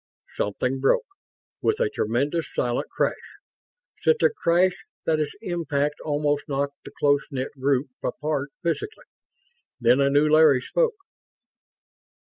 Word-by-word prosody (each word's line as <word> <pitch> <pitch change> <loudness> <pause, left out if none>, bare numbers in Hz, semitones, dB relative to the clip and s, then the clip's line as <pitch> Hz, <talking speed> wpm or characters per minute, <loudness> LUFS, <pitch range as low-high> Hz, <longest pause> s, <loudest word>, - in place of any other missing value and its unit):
Something 125 +6 -1
broke, 135 - +2 0.6
with 435 - +1
a 485 - +3
tremendous 145 - -1
silent 120 0 -1
crash. - - +1 0.9
Such 470 0 +3
a 475 - +5
crash 180 - +2 0.3
that 155 -1 +2
its 150 - -2
impact 150 -6 -1
almost 145 -1 0
knocked 140 0 -3
the - - -10
close 145 -1 +4
knit 130 -1 -3
group 135 0 +2 0.2
apart 145 +1 -2
physically. 425 - -3 0.7
Then 125 +3 +4
a 140 - +4
new 145 +2 +4
Larry 155 -4 +5
spoke. 475 - +1
145 Hz, 125 wpm, -25 LUFS, 135-170 Hz, 0.9 s, a